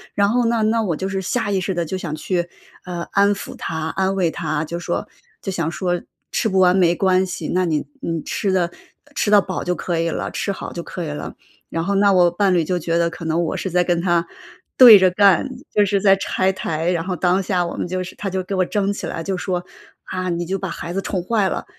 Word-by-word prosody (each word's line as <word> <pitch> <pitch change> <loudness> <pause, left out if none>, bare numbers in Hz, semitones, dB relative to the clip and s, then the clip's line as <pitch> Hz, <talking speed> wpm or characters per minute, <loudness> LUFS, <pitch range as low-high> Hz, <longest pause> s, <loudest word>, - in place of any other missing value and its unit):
然 200 0 +3
后 245 +1 +2
呢， 230 -1 +1
那 225 +1 +2
我 170 -6 -1
就 190 +5 -3
是 195 0 -2
下 215 +3 -1
意 195 - +1
识 190 +1 -2
地 170 - -1
就 190 +4 -3
想 155 -4 -4
去， 175 +1 -2 0.4
呃， 175 -2 -4
安 200 +1 +4
抚 - - -8
他、 160 0 -4
安 190 +2 0
慰 180 -3 +2
他， 155 -2 -2
就 170 +2 -5
说 175 0 -3 0.3
就 195 - -3
想 165 -3 -1
说 175 -1 -1 0.3
吃 - - 0
不 190 - 0
完 180 0 +5
没 175 -2 +4
关 185 0 +3
系， 180 - -5
那 185 0 +1
你 155 -3 -1 0.2
你 165 -2 -2
吃 195 - -1
得 175 -2 +1 0.4
吃 - - 0
到 205 - +7
饱 185 -1 -4
就 180 - 0
可 170 -2 -2
以 165 0 0
了， - - -3
吃 200 - -2
好 - - -6
就 170 - -4
可 175 - -6
以 - - -5
了。 150 0 -6 0.3
然 165 0 -2
后 200 - 0
那 200 0 +4
我 180 -2 +5
伴 195 +1 +2
侣 170 - +3
就 180 +3 -1
觉 165 +1 -1
得 170 0 +1
可 165 0 -8
能 165 +2 +1
我 - - -2
是 190 - -3
在 180 +1 +2
跟 175 -1 0
他 170 -2 +1 0.5
对 240 -5 +11
着 185 -1 +4
干， 200 +4 +4 0.2
就 210 - +3
是 200 0 +1
在 195 -1 +6
拆 190 0 0
台。 165 -2 -2
然 170 -2 -1
后 185 -1 -2
当 180 +3 +1
下 180 -2 0
我 - - -6
们 - - -2
就 185 +1 -2
是 180 - -9
他 205 - -5
就 190 - -1
给 185 +2 -4
我 185 -1 +2
争 200 0 0
起 205 - -5
来 165 - -4
就 190 0 -2
说： 180 -1 -2 0.4
“啊， 185 0 -3
你 175 0 -2
就 195 +2 -1
把 195 - -4
孩 170 - -6
子 195 - 0
宠 185 -1 -2
坏 205 0 +1
了， - - -3
185 Hz, 275 characters per minute, -21 LUFS, 170-195 Hz, 0.5 s, 对